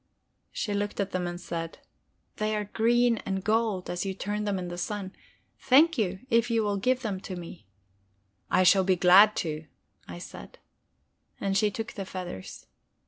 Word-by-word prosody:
She 210 - -3
looked 205 +1 -2
at 200 -1 -1
them 180 -1 -1
and 175 0 -5
said: 165 -2 -5 0.6
"They 215 0 0
are 210 - -1
green 235 +3 +2
and 190 -2 -3
gold, 215 -3 0
as 175 0 -3
you 195 -1 -3
turn 210 +2 -3
them 200 -2 0
in 180 -1 -4
the 175 - -5
sun. 195 +1 -4 0.4
Thank 300 +6 +5
you, 190 -5 -1
if 235 -1 +2
you 230 -1 +2
will 205 -1 0
give 255 +5 +1
me 200 -4 -2
them." 180 -3 -7 0.9
"I 185 - +4
should 190 +1 +5
be 190 - +4
glad 190 +4 +7
to," 155 -1 -5 0.4
I 85 - -8
said. - - -10 0.8
And 195 -1 -1
she 210 +1 +3
took 225 +3 -5
the 195 - -5
feathers. 180 - -7
200 Hz, 175 wpm, -28 LUFS, 185-220 Hz, 0.9 s, glad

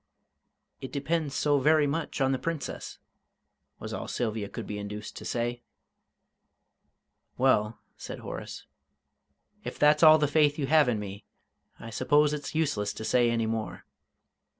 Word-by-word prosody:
"It 130 - -7
depends 145 0 -2
so 145 -1 +2
very 155 +2 +4
much 145 0 -3
on 135 0 +3
the 130 - 0
Princess," 165 +1 -5 0.8
was - - -7
all - - -5
Sylvia 110 -4 -3
could - - -6
be 105 0 -5
induced 105 +1 -7
to - - -8
say. 120 0 -2 1.8
"Well," 115 -4 +2 0.2
said - - -7
Horace, - - -7 1.0
"if - - -6
that's 150 +1 +4
all 155 -1 +9
the 150 -1 +1
faith 145 0 +3
you 145 - -1
have 150 -1 +4
in 110 -3 0
me, 100 0 -8 0.5
I 115 - -9
suppose 145 +5 +3
it's 150 0 -5
useless 140 -11 0
to 110 - -7
say 120 0 +3
any 115 -1 0
more. 110 -1 -4
135 Hz, 150 wpm, -28 LUFS, 115-150 Hz, 1.8 s, all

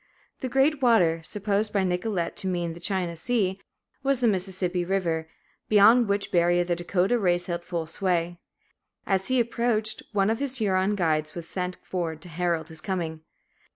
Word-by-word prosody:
"The 260 - -3
great 270 +3 +2
water," 180 -10 +4
supposed 210 +4 -1
by 200 -2 +1
Nicolet 180 -1 -1
to 190 - -2
mean 175 -2 -1
the 170 - -11
China 180 -2 -1
Sea, 195 0 -1 0.4
was 275 -1 +1
the 245 - +3
Mississippi 185 -3 -1
River, 170 -4 -1 0.4
beyond 220 +3 +6
which 200 0 0
barrier 175 0 +3
the 175 0 -1
Dakotah 180 +6 +1
race 175 -3 +1
held 175 -1 -3
full 170 -2 -3
sway. 175 0 -1 0.7
As 190 -1 0
he 255 -1 +2
approached, 230 -2 0
one 200 -1 +2
of 225 - -1
his 275 -2 -2
Huron 195 -2 +1
guides 155 -4 0
was 170 -1 -5
sent 180 -1 -3
forward 165 -4 -3
to 175 - -11
herald 170 -1 -1
his 160 -1 -8
coming. 165 -5 -3
185 Hz, 170 wpm, -26 LUFS, 175-210 Hz, 0.7 s, beyond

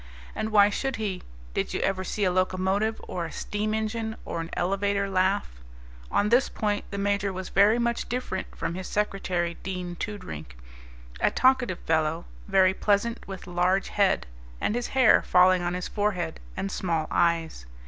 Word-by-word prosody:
And 215 - -2
why 205 -1 +6
should 270 +5 -2
he? 200 -4 -3 0.3
Did - - -2
you - - 0
ever 190 -1 0
see 205 +2 -2
a 185 - +3
locomotive 190 +4 +1
or 175 -2 -3
a 160 - -7
steam 215 +1 -2
engine 220 0 -2
or 170 - -3
an 165 - -6
elevator 200 +2 0
laugh? 185 - 0 0.5
On 205 - +2
this 245 +4 +4
point 210 -1 -1
the 200 - -5
Major 200 0 0
was 185 -1 -6
very 205 +4 +5
much 235 -1 -1
different 240 -6 -4
from - - -3
his 185 +1 -5
secretary, 180 -4 -1
Dean 180 -2 -4
Toodrink, 80 - -6 0.6
a - - +3
talkative 255 -7 +3
fellow, 160 +1 0 0.2
very 190 -1 +4
pleasant, 210 +4 0
with 195 -1 -7
large 180 +2 +1
head, 200 -2 +2 0.3
and - - 0
his 240 +1 -1
hair 255 -4 +6
falling 180 0 +5
on 175 0 -1
his 180 - -3
forehead, 200 -6 -1 0.2
and 195 +1 -2
small 165 -5 -1
eyes. 165 - +1
195 Hz, 170 wpm, -27 LUFS, 180-210 Hz, 0.6 s, why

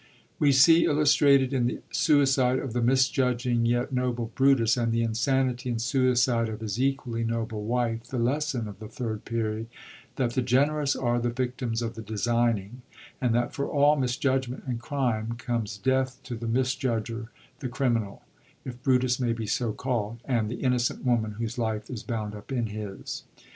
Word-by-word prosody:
We 145 -2 +4
see 165 +5 +6
illustrated, 140 -2 +4
in 125 -3 +2
the - - -3
suicide 135 -4 +3
of 130 -3 -4
the 120 - 0
misjudging 125 -2 +2
yet 120 +3 0
noble 120 -2 -1
Brutiis, 135 -4 +4
and 115 -2 0
the 115 0 +1
insanity 125 +2 0
and 115 -2 -1
suicide 125 -2 +2
of 110 0 -6
his 110 +2 -3
equally 130 -4 -1
noble 115 -2 -3
wife, 115 0 -1
the 125 - -5
lesson 125 -1 0
of 100 -1 -10
the 110 - -8
Third 110 -2 -5
Period, 110 -1 -2 0.5
that 125 -3 0
the 130 - +1
generous 140 +3 +2
are 120 -1 0
the 120 0 0
victims 125 -1 -2
of 115 0 -3
the 115 - -8
designing, 115 +1 -1 0.4
and 120 -3 +2
that 120 0 0
for 140 -2 -2
all 145 +1 +4
mis 130 -3 -1
judgment 130 -2 -1
and 125 -3 -3
crime 120 -4 -1
comes 115 -3 -3
death 130 +4 0
to 125 - -5
the 115 0 -5
misjudger, 120 -2 -1 0.3
the 130 - -4
criminal, 120 -6 -1 0.2
— - - -33
if 125 -1 -7
Brutus 125 -1 +2
may 120 -2 +1
be 115 -1 -4
so 110 +2 0
calld, 115 -1 -2
— - - -25
and 115 -5 0
the 120 - -5
innocent 125 0 0
woman 115 -4 +1
whose 115 +2 -4
life 110 -1 -2
is 120 -4 -5
bound 110 -3 -4
up 105 +5 -10
in 120 -3 0
his. 105 -2 -6
120 Hz, 180 wpm, -27 LUFS, 115-130 Hz, 0.5 s, see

